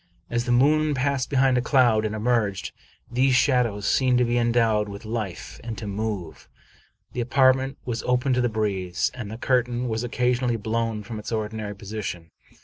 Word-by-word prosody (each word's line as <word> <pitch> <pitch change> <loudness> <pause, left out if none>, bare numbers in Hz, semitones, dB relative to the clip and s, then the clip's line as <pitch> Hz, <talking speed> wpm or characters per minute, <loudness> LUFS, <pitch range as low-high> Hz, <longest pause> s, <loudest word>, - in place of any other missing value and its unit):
As 120 0 0
the 125 - -1
moon 150 +4 +3
passed 135 0 0
behind 130 -2 +3
a - - 0
cloud 120 -5 +3
and 110 0 -2
emerged, 110 -3 0 0.4
these 130 +1 +3
shadows 120 -6 +2
seemed 130 -2 +3
to 125 - +3
be 120 0 0
endowed 115 -3 +2
with 100 +2 -9
life, 110 -5 -5
and 115 -2 -5
to 110 - -6
move. 100 -4 -4 0.6
The 125 - -2
apartment 130 +1 +3
was 120 -2 -2
open 125 +1 +2
to 125 - +2
the 120 - +1
breeze, 95 -5 -1
and 120 -5 -7
the 110 - -6
curtain 125 0 0
was 110 0 -2
occa 125 +1 +1
sionally 120 -2 -1
blown 110 0 -2
from 110 0 -6
its 105 - -7
ordinary 110 -1 -3
position. 100 -5 -6
120 Hz, 180 wpm, -24 LUFS, 110-125 Hz, 0.6 s, moon